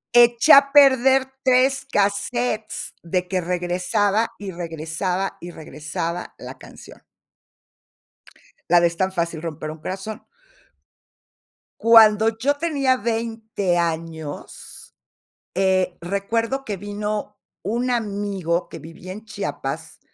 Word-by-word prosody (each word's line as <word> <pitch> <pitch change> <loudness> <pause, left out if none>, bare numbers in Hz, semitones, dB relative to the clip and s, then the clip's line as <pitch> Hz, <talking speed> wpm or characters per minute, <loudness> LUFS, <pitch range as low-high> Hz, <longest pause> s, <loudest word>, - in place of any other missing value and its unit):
Eché 240 +4 +7
a 275 0 +8
perder 270 -2 +6 0.2
3 260 +1 +3
casetes, 215 +3 -1
de 180 +1 -2
que 185 0 -1
regresaba, 180 +5 0
y 200 -2 -6
regresaba, 170 +3 -3
y 175 - -7
regresaba 165 +2 -5
la - - -9
canción. - - -14 1.7
La 175 - +7
de 170 - +4
"Es 170 - -6
tan 190 +2 0
fácil 170 -3 -2
romper 155 -2 -5
un 155 - -10
corazón". 195 +6 -6 1.6
Cuando 220 -1 +6
yo 280 +5 +1
tenía 285 -4 +1
20 225 -5 -2
años, 160 -3 -5 0.6
eh, 185 -1 +1
recuerdo 225 +8 -1
que 205 -2 -4
vino 205 +1 -4 0.2
un 235 +6 -1
amigo 200 -7 -1
que - - -9
vivía 165 +3 -10
en 215 +4 -9
Chiapas, - - -5
200 Hz, 110 wpm, -22 LUFS, 175-230 Hz, 1.7 s, a